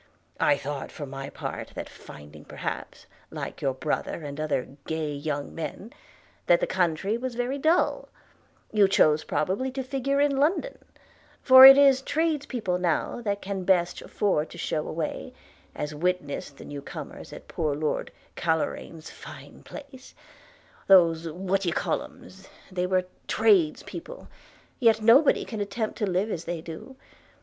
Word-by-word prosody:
I 145 - +3
thought, 140 0 -5
for 145 - -7
my 135 0 -7
part, - - -6
that - - -5
finding 75 0 -13
perhaps, - - -6 0.2
like - - -7
your 135 -2 0
brother 155 +3 -3
and 145 0 -7
other 150 -4 -1 0.2
gay 160 -2 -2
young 145 0 -4
men, 190 +7 -6 0.5
that 175 - +5
the - - +1
country 190 +4 0
was 255 -1 -4
very 245 +3 -2
dull, 320 +5 +1 0.6
you 210 -2 +5
chose 155 -5 +3
probably 195 +11 -1
to 265 0 -3
figure 275 +1 -1
in 285 -1 +2
London; 340 - 0 0.6
for 260 0 +11
it 270 0 +10
is 275 -2 +6
trades 305 0 -1
people 190 -8 -2
now 180 +6 -1
that 205 -3 -2
can 195 -1 -4
best 180 -2 +1
afford 165 -7 -1
to - - -11
shew 155 - -2
away, 160 -1 -4 0.4
as 150 +1 -4
witness 180 -1 -2
the 140 - -14
new 145 -1 -7
comers - - -9
at - - -11
poor 155 -3 -2
Lord 150 +1 -2 0.3
Carloraine's 160 0 -2
fine - - -12
place 275 -3 -12 0.4
– - - -29
those 165 -4 +5
what 190 +4 -1
d'ye 175 -3 0
callums 190 +2 -4
– - - -23
they 180 -1 -1
were 185 0 +1 0.2
trades 370 -8 +3
people - - -9 0.2
– - - -29
yet 225 -4 +4
nobody 235 +7 +5
can 220 -3 -5
attempt 210 +2 -3
to 210 -3 0
live 190 +4 0
as 170 -3 -4
they 170 0 -3
do. 165 +11 -9
185 Hz, 160 wpm, -26 LUFS, 155-255 Hz, 0.6 s, for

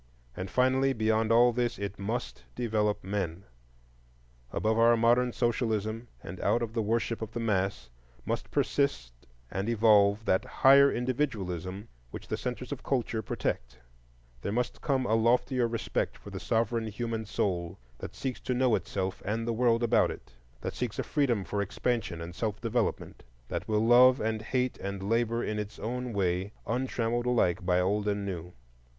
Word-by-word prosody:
And 95 +1 -5
finally, 130 +3 +2
beyond 110 -1 +1
all 120 +1 +6
this, 120 0 -1
it 100 -1 -5
must 115 +5 -4
develop 105 -3 0
men. 95 -2 -3 1.1
Above 110 +1 +1
our 115 0 +6
modern 120 +2 +3
socialism, 115 -2 -1 0.2
and - - -8
out 120 - +2
of 110 -1 -4
the 115 - 0
worship 115 +1 -1
of 110 0 -5
the 120 - -3
mass, 95 - -1 0.3
must - - -3
persist 65 - 0 0.4
and 95 +4 -2
evolve 105 -2 +4
that 95 +1 +2
higher 135 +2 +6
individualism 105 - -2 0.2
which - - -9
the - - 0
centres - - -5
of - - -4
culture 120 -4 -1
protect; - - -3 0.6
there 100 - -3
must 120 +3 -2
come 135 -3 +1
a 110 - +1
loftier 120 +2 +2
respect 115 -3 -2
for - - -12
the - - -5
sovereign 115 0 0
human 110 +1 -3
soul 90 -5 -2 0.2
that - - -7
seeks 130 -2 -4
to 125 - -2
know 125 -1 +3
itself 95 -2 -2
and 115 +3 -2
the 115 - +1
world 115 0 +2
about 115 -1 +3
it; - - -9 0.3
that - - -4
seeks 125 -4 -3
a - - -1
freedom 125 -9 +1
for 100 +3 -2
expansion 100 -3 -2
and 85 +1 -7
self 105 +2 -3
development; 115 +1 -2 0.3
that - - -4
will 110 0 +1
love 125 +2 +7
and 110 0 -1
hate 125 +2 -1
and 100 0 -4
labor 115 +1 +1
in 105 0 -2
its 105 0 -6
own 125 +2 -3
way, 95 0 -1
untrammeled 120 -1 -1
alike 100 -9 +2
by 90 0 +2
old 100 +3 0
and 100 -1 -1
new. 90 -3 -5
110 Hz, 170 wpm, -29 LUFS, 100-120 Hz, 1.1 s, love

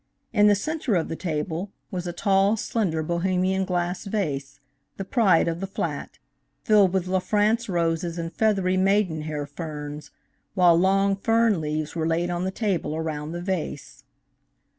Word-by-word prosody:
In 210 -1 +5
the 205 - +6
center 285 0 -1
of 165 - 0
the 165 - -3
table 165 +3 -3 0.2
was 180 -1 -4
a - - -2
tall, 195 +4 +2
slender 185 -8 -1
Bohemian 185 +3 0
glass 180 +1 -2
vase, 145 -9 -3 0.4
the 195 - -4
pride 195 -8 +3
of 165 0 -2
the 195 - -3
flat, 195 - -4 0.5
filled 205 -4 +5
with 190 -1 0
La 185 0 +1
France 215 +4 +1
roses 170 -1 -1
and 165 0 -4
feathery 195 -4 +1
Maiden 190 -4 +2
Hair 150 -1 -4
ferns, 150 0 -7 0.5
while 175 -2 +6
long 195 +3 +3
fern 225 -2 +2
leaves 155 +1 -3
were 160 -1 -1
laid 170 +2 0
on 175 +1 -2
the - - 0
table 190 -6 -1
around 155 -1 -3
the 175 +1 -5
vase. 175 -6 -4
180 Hz, 160 wpm, -25 LUFS, 160-195 Hz, 0.5 s, the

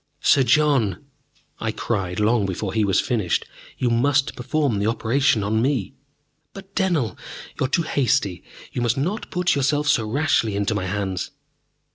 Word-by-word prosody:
"Sir 140 - +5
John!" 135 - +2 0.5
I 115 - -1
cried, 95 -5 -2
long 105 -1 +2
before 95 +1 -3
he 110 -1 +2
was 95 -2 +2
finished. 105 -9 0 0.3
"You 125 -2 0
must 135 +4 +2
perform 130 -3 0
that 100 - 0
operation 115 0 +1
on 110 +2 +1
me!" 130 -4 0 0.6
"But, 195 0 -12
Dennell, 175 - 0 0.4
you - - +2
are - - -16
too 170 +4 +1
hasty. 120 - 0 0.3
You - - -3
must 120 +1 +1
not 185 +11 -2
put 180 -1 +1
yourself 145 +1 +1
so 110 -6 +2
rashly 130 -5 +1
into 100 -1 0
my 95 - -2
hands." 95 -2 -2
120 Hz, 160 wpm, -22 LUFS, 105-145 Hz, 0.6 s, Sir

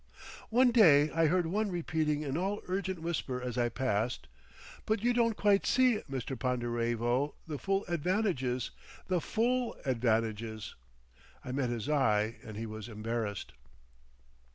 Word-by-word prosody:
One 245 +2 +5
day 155 - +6
I 165 0 +3
heard 180 +2 +2
one 205 +5 0
repeating 160 -4 -1
in 140 -2 -3
all 195 +5 -1
urgent 185 -2 -2
whisper 150 -6 -2
as 125 -1 -4
I 120 -1 +1
passed 115 - -1 0.6
"But 215 -1 0
you 245 +1 +3
don't 230 -2 +2
quite 205 -1 +3
see, 255 -4 +3
Mr. 135 0 -3
Ponderevo, 120 +2 0
the 150 -3 -5
full 195 0 0
advantages, 170 - 0 0.4
the 180 -2 +1
full 240 +6 0
advantages—" 115 -3 -1 0.7
I 125 - -4
met 130 -1 0
his 115 -3 -3
eye 115 -7 +2
and 110 -2 -8
he 115 - -3
was 110 +1 -7
embarrassed. 110 -1 -4
140 Hz, 140 wpm, -31 LUFS, 120-190 Hz, 0.7 s, day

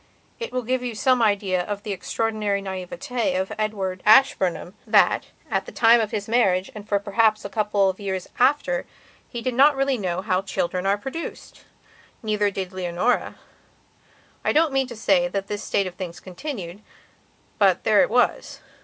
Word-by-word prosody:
It 470 - -5
will 255 0 -2
give 255 +2 -1
you 245 -2 -4
some 255 +2 +2
idea 200 -4 +1
of 205 +2 -5
the 210 - -4
extraordinary 215 0 -1
naïveté 190 +2 -3
of 190 +2 -3
Edward 195 -4 -2
Ashburnham 195 -7 +3
that, 215 -1 +3 0.2
at - - -2
the - - -7
time 235 +1 +5
of 215 - -2
his 205 -2 -4
marriage 195 -6 +2
and 210 0 -10
for 205 - +3
perhaps 215 +1 +1
a - - -4
couple 205 -2 +1
of 190 -1 -2
years 190 -2 -4
after, 290 - +2 0.4
he 235 -2 -6
did 255 - -1
not 280 +4 +5
really 270 -2 0
know 185 -1 -2
how 185 -3 +1
children 185 -1 -2
are 200 +1 +2
produced. 270 +10 -8 0.6
Neither 210 -1 +1
did 190 -2 -5
Leonora. 185 +5 -1 1.1
I - - +2
don't 310 -2 +2
mean 270 -1 +1
to 240 - -8
say 265 +4 +2
that 200 -6 -3
this 205 +1 -5
state 200 - 0
of 185 - -5
things 180 -2 -7
continued, 190 - -7 0.8
but - - +3
there - - +4
it - - +2
was. - - 0
210 Hz, 175 wpm, -23 LUFS, 190-245 Hz, 1.1 s, time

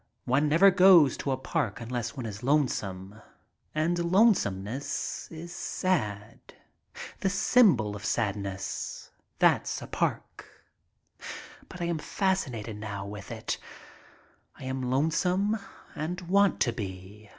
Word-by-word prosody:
One 140 +4 +2
never 180 +6 +6
goes 180 -7 +7
to - - -4
a 130 - +1
park 120 -4 -2
unless 120 +1 -4
one 125 - -4
is 105 -1 -6
lone 140 +2 +3
some. 95 0 -6 0.5
And 170 +2 0
lonesomeness 135 - +1
is 170 +2 -8
sad. 110 - -2 0.8
The 195 - +1
symbol 190 - +4
of 105 - -9
sadness, 100 -3 -3 0.3
that's - - +2
a - - -8
park. - - -3 1.2
But 180 - -9
I - - 0
am 170 -2 -1
fascinated 130 - -2
now 100 -2 -5
with 100 -1 -8
it. - - -4 1.0
I - - -11
am 130 -1 -3
lonesome 180 - +1 0.4
and 170 +4 -3
want 195 +3 +3
to 120 - +2
be. 100 -1 -8
130 Hz, 125 wpm, -28 LUFS, 105-175 Hz, 1.2 s, goes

